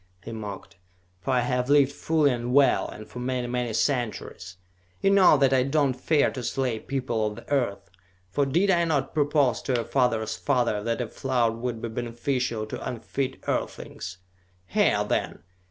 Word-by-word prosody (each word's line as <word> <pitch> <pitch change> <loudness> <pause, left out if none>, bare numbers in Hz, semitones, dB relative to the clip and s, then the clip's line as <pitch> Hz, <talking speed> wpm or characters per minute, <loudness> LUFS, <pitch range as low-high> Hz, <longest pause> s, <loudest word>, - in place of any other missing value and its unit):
he - - -7
mocked. 105 -4 -7 0.4
"For 95 - -7
I 125 -1 +3
have 125 +1 -1
lived 140 -1 +5
fully 150 0 +2
and 120 +1 -2
well, 140 -3 +4
and 110 - -10
for 125 - -9
many, 125 0 -2
many 120 -1 -2
centuries! 110 -8 -2 0.4
You 195 - +3
know 190 -6 +6
that 135 -1 +3
I 130 - +4
do 140 +3 +2
not 130 -2 0
fear 150 +2 +2
to 130 - -5
slay 125 -1 -1
people 125 -5 -1
of 105 - -5
the 115 - -12
Earth, 100 -8 0 0.4
for 140 +6 +1
did 175 +8 +3
I 170 -2 +3
not 150 -5 0
propose 145 -4 +2
to 130 - -1
your 115 -2 -1
father's 120 -5 +1
father 120 -7 0
that 115 +3 -1
a 120 - -2
flood 120 -3 0
would 115 -1 -4
be - - -1
beneficial 120 0 -2
to 110 - -7
unfit 125 +3 -4
earthlings? 90 +1 -4 0.5
Hear, 90 - +2
then! - - -2
125 Hz, 180 wpm, -26 LUFS, 115-140 Hz, 0.5 s, know